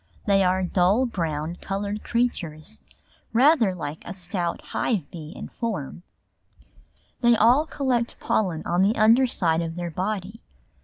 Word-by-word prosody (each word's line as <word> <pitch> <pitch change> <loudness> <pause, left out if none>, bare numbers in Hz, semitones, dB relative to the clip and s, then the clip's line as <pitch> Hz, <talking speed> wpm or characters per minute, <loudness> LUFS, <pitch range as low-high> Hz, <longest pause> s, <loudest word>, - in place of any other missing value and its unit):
They 195 -1 +4
are 185 +1 +2
dull 185 +7 +2
brown 165 -6 -3
coloured 200 +2 -4
creatures 160 - -2 0.5
rather 240 - +4
like 150 -2 -6
a 180 - -7
stout 175 -1 -2
hive 190 -12 -1
bee 155 -3 -8
in - - -8
form 195 - -4
(pl. - - -45
C, - - -32
20). 240 -1 +5
They - - -1
all 250 +9 +4
collect 250 -6 -1
pollen 175 -7 0
on 175 +1 +1
the 205 +4 +3
underside 215 -7 +3
of 165 -1 -4
their 175 -1 -4
body. 200 +4 -4
190 Hz, 150 wpm, -24 LUFS, 170-230 Hz, 0.5 s, 20